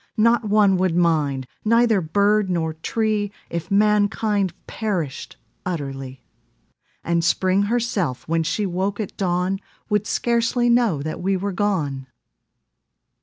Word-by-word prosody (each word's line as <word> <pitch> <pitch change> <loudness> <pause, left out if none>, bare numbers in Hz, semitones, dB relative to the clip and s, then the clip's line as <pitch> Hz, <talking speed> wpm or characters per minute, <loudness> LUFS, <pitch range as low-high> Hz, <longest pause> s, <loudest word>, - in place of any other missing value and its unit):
Not 230 +1 +3
one 200 -2 +4
would 180 -2 +1
mind, 150 -6 +1 0.2
neither 230 -2 +3
bird 200 +4 +2
nor 165 -3 -1
tree 210 +5 -1 0.2
If 170 +1 -4
mankind 205 -1 +2
perished 180 - -4 0.3
utterly; 135 -6 -5 0.8
And 170 0 0
Spring 185 +3 +2
herself, 215 - -1
when 165 +1 +1
she 165 +6 -1
woke 190 +3 -2
at 210 - -4
dawn, 180 0 0 0.3
Would 210 0 +1
scarcely 240 +1 +1
know 225 - +2
that 155 - -5
we 190 +1 +1
were 200 +2 -2
gone. 155 -10 -1
195 Hz, 120 wpm, -22 LUFS, 165-215 Hz, 0.8 s, one